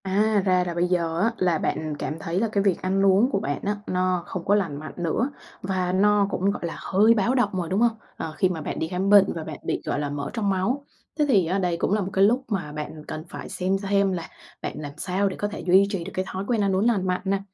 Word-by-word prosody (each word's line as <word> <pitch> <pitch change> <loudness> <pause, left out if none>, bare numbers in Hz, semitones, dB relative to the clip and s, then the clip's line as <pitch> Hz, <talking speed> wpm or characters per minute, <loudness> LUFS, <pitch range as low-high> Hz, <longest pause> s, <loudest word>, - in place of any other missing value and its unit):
À, 205 +2 +2
ra 185 -1 +3
là 175 - -2
bây 175 +1 +1
giờ 170 -2 0
á 225 +5 +2
là 175 -3 +2
bạn 155 -1 -2
cảm 150 - -3
thấy 165 +3 -2
là 225 - +1
cái 200 -2 +1
việc 195 -3 +1
ăn 195 +1 +1
uống 195 +6 +5
của 195 - +1
bạn 145 -6 -2
á, 205 +1 0
nó 185 -1 0
không 180 -2 -6
có 200 - +4
lành 165 -9 -1
mạnh 155 - -8
nữa 175 - 0 0.3
và 185 -1 -1
nó 205 +2 +3
cũng, 195 +1 +1
gọi 200 - -5
là, 165 - -5
hơi 210 +4 +4
báo 230 +4 +1
động 245 - +3
rồi, 175 -3 -2
đúng 190 - +1
hông? 235 -1 +3 0.2
Ờ, 160 - -5
khi 185 - +3
mà 165 -3 -3
bạn - - -4
đi 160 - -1
khám 185 +3 -1
bệnh 200 -1 +6
và 165 - -5
bạn 155 -2 -7
bị, - - -2
gọi - - -1
là, 145 -1 -2
mỡ 145 0 -4
trong 215 -4 0
máu. 230 +9 0 0.3
Thế 300 - +4
thì 200 -10 +4
á 185 +4 0
đây 175 -2 0
cũng 185 - 0
là 210 - +2
một 190 - -3
cái 195 - +4
lúc 245 +6 +3
mà 195 -9 -3
bạn 150 0 -7
cần 155 - -5
phải - - -8
xem 185 +1 0
hem 200 0 +2
là 170 -3 -4 0.3
bạn - - -4
làm 145 -2 -6
sao 190 +4 0
để 185 - -6
có 205 - -2
thể 205 - -7
duy 190 +2 +4
trì 195 -4 -3
được 190 - -7
cái 185 - -1
thói 190 +1 -4
quen 235 -4 +1
ăn 195 -2 +2
uống 195 +3 +2
lành 205 -6 +2
mạnh 180 0 0
nè. 195 0 +1
190 Hz, 285 wpm, -25 LUFS, 170-200 Hz, 0.3 s, bệnh